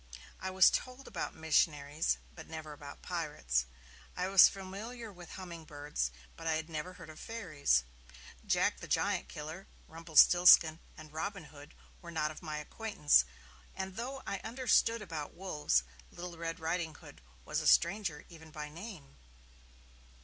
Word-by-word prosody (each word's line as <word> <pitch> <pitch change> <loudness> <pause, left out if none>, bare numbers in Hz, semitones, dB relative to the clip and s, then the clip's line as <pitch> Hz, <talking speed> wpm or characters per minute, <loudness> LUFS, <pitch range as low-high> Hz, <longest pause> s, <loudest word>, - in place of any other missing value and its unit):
I 190 - -3
was 190 0 +6
told 255 +2 -3
about - - -4
missionaries, 155 -1 +1 0.2
but 160 - -11
never 155 -1 -7
about 145 -1 -11
pirates; 150 - -1 0.5
I 180 +1 -1
was 195 -1 +9
familiar 210 +4 -7
with 175 -2 -11
hummingbirds, 155 - -4 0.3
but 165 - -7
I 160 - +2
had 160 +1 -3
never 160 +4 -4
heard 160 - -11
of 155 - -13
fairies 155 - +1 0.6
Jack - - +1
the - - -8
Giant - - 0
Killer, 155 +6 -7 0.2
Rumpelstiltskin 165 0 +6 0.2
and 155 -1 -12
Robin 195 +3 -3
Hood 145 +1 -13 0.3
were 170 - -10
not 155 -2 -1
of 155 - -11
my 155 -3 -4
acquaintance; 150 - +2 0.5
and 190 0 -5
though 265 +4 -5
I 200 - -3
understood 230 -1 +2
about 160 -6 -6
wolves, 150 - +1 0.3
Little 175 0 -8
Red 165 +1 -4
Ridinghood 160 -1 -4 0.2
was - - -1
a - - -1
stranger 170 -4 +3
even 160 -2 -13
by 150 -1 -6
name. 165 -4 -10
165 Hz, 145 wpm, -33 LUFS, 150-190 Hz, 0.6 s, was